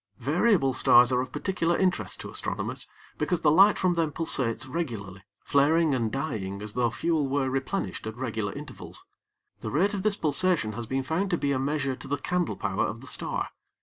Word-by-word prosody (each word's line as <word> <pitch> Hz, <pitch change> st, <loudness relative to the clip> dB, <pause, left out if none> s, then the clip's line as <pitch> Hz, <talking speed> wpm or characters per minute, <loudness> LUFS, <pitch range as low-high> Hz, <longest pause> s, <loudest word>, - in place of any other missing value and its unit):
Variable 150 Hz, -, +2 dB
stars 120 Hz, 0 st, +6 dB
are 125 Hz, 0 st, +2 dB
of 130 Hz, -, -6 dB
particular 175 Hz, -3 st, 0 dB
interest 185 Hz, -2 st, 0 dB
to -, -, -7 dB
astronomers -, -, -4 dB, 0.3 s
because 180 Hz, -3 st, 0 dB
the 150 Hz, -, +4 dB
light 195 Hz, +6 st, +6 dB
from 185 Hz, -1 st, +2 dB
them 165 Hz, -3 st, 0 dB
pulsates 130 Hz, -6 st, 0 dB
regularly, 115 Hz, -, -5 dB, 0.2 s
flaring 155 Hz, +2 st, +3 dB
and 115 Hz, -4 st, 0 dB
dying 110 Hz, -9 st, -3 dB
as 105 Hz, 0 st, -4 dB
though 120 Hz, -1 st, +1 dB
fuel 155 Hz, +3 st, 0 dB
were 135 Hz, -1 st, 0 dB
replenished 135 Hz, -, -3 dB
at 110 Hz, +1 st, -6 dB
regular 110 Hz, -5 st, -2 dB
intervals. -, -, -9 dB, 0.5 s
The -, -, -5 dB
rate 195 Hz, +8 st, +2 dB
of 200 Hz, -, -2 dB
this 210 Hz, 0 st, +1 dB
pulsation 155 Hz, -5 st, +1 dB
has 115 Hz, +1 st, -6 dB
been 135 Hz, +2 st, -1 dB
found 165 Hz, +8 st, -1 dB
to 175 Hz, -, +1 dB
be 140 Hz, -, 0 dB
a 135 Hz, -, +1 dB
measure 140 Hz, -1 st, -1 dB
to 135 Hz, -, -10 dB
the 145 Hz, +1 st, -1 dB
candle 180 Hz, +4 st, -1 dB
power 100 Hz, -1 st, 0 dB
of 115 Hz, -, -6 dB
the -, -, -11 dB
star. -, -, -2 dB
140 Hz, 195 wpm, -27 LUFS, 120-170 Hz, 0.5 s, stars